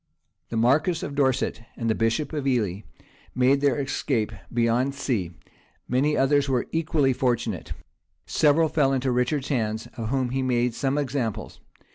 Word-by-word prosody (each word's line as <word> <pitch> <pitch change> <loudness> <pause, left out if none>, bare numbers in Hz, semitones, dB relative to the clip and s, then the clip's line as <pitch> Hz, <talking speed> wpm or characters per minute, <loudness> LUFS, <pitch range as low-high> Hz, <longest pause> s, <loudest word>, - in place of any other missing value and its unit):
The 115 - -3
marquis 145 +9 +2
of 145 - -6
Dorset 130 -5 0 0.2
and 115 - -2
the 110 - +3
bishop 115 +8 0
of 145 -3 -2
Ely 105 -8 0 0.6
made 130 +2 +3
their 140 -2 +2
escape 135 -5 -1 0.2
beyond 120 +3 +1
sea; 115 -11 -1 0.6
many 140 +5 +1
others 140 +1 +2
were 125 -2 +1
equally 155 -4 +1
fortunate; 120 -7 -1 0.5
several 155 +2 +3
fell 140 -3 +2
into 130 -1 0
Richard's 125 +3 0
hands, 110 -5 -1
of 115 -2 -3
whom 130 -1 0
he 135 +1 -1
made 125 -2 +1
some 135 +4 -1
examples. 130 -6 -3
130 Hz, 150 wpm, -25 LUFS, 120-140 Hz, 0.6 s, the